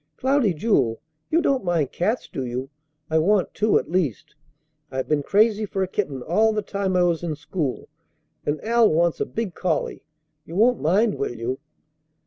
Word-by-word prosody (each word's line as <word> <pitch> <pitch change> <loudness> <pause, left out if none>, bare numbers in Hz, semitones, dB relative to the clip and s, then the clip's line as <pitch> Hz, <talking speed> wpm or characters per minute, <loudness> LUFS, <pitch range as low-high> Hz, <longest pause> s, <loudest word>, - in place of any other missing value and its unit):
Cloudy 265 -5 +2
Jewel, 140 - +1 0.3
you 335 +2 +2
don't 270 -8 +1
mind 170 -6 0
cats, 185 0 -1
do 140 -3 -4
you? 130 +2 -4 0.4
I 160 - +4
want 195 +3 +2
two 215 +1 +3
at - - -2
least. 170 - -1 0.6
I've 130 -1 -3
been 150 -1 +1
crazy 215 +6 +3
for 195 -2 -1
a - - -1
kitten 150 -10 -3
all 215 - +2
the 210 -1 -1
time 195 -2 -2
I 180 - +4
was 170 -2 +1
in 165 -3 -3
school, 145 -2 -3 0.6
and 145 +1 -1
Al 230 0 +4
wants 170 +1 +2
a - - -1
big 220 -5 -3
collie. 165 -3 -2 0.4
You 165 - -10
won't 235 +4 +3
mind, 200 +7 +2
will 120 - -2
you?" 120 +3 -3
180 Hz, 180 wpm, -23 LUFS, 150-215 Hz, 0.6 s, I